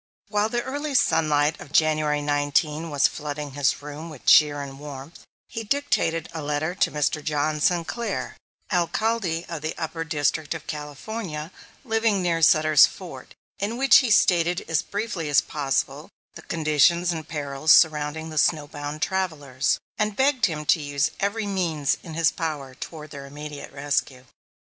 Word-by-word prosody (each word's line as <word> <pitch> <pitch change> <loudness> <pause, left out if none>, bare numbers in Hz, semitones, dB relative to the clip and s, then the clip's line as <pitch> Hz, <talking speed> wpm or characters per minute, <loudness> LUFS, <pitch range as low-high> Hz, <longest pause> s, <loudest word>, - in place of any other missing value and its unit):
While 210 0 +1
the 240 +1 -1
early 285 +1 -4
sunlight 155 - +2
of 145 - -11
January 155 -1 +2
19 145 +2 0
was 145 -2 +2
flooding 150 -1 -6
his 135 -1 0
room 150 +3 -7
with 150 -5 -12
cheer 145 -2 +5
and 135 -1 -9
warmth, 145 +1 -10 0.2
he 225 - -5
dictated 220 -10 0
a 160 - -4
letter 150 +3 -2
to 190 - +1
Mr. 150 +1 -1
John 150 0 -1
Sinclair, 180 +8 -1 0.4
Alcalde 180 -1 0
of 165 -3 -6
the 155 +1 -4
Upper 165 0 -3
District 155 0 -1
of 160 - -8
California, 150 +2 -6 0.3
living 225 -3 +1
near 165 -2 0
Sutter's 155 -1 +6
Fort, - - -11 0.2
in 210 +4 -2
which 270 +1 +7
he 255 - +2
stated 175 -4 +3
as 160 -3 +1
briefly 200 -7 -4
as 145 - +5
possible 140 -3 -2 0.2
the - - -10
conditions 165 +2 +2
and 160 -2 -5
perils 145 0 0
surrounding 155 0 +3
the 155 - 0
snow 150 -2 +2
bound 145 +1 -5
travellers, 155 -9 -1 0.2
and 210 -1 0
begged 265 -2 +3
him 150 -3 -5
to 160 +1 +3
use 145 -1 0
every 205 +2 -1
means 170 -8 0
in 165 -3 -9
his 165 -2 +3
power 150 -6 -4
toward 155 +3 -9
their 140 -1 -8
immediate 145 +1 -8
rescue. 140 -2 -2
155 Hz, 160 wpm, -24 LUFS, 145-180 Hz, 0.4 s, which